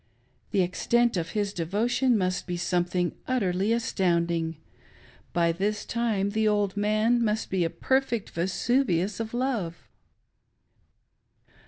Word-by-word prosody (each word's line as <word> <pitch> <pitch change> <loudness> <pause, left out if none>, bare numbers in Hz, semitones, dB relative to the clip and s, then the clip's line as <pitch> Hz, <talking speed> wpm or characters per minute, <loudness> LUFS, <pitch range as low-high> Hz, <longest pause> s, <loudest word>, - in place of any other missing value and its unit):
The 195 -2 +2
extent 235 +6 +1
of 165 -2 -2
his 205 -2 -1
devotion 225 +8 +1
must 185 -2 -1
be 175 -1 -2
something 175 0 0 0.2
utterly 200 -5 +1
astounding; 170 -7 0 0.7
by 170 -1 +2
this 205 +5 -2
time 220 -4 0
the 220 +1 +1
old 205 -2 +1
man 215 +3 +2
must 215 0 -1
be 190 -2 +1
a 165 - 0
perfect 260 0 0
Vesuvius 190 +2 0
of 225 -1 -3
love 235 -10 -2
205 Hz, 120 wpm, -27 LUFS, 175-230 Hz, 0.7 s, The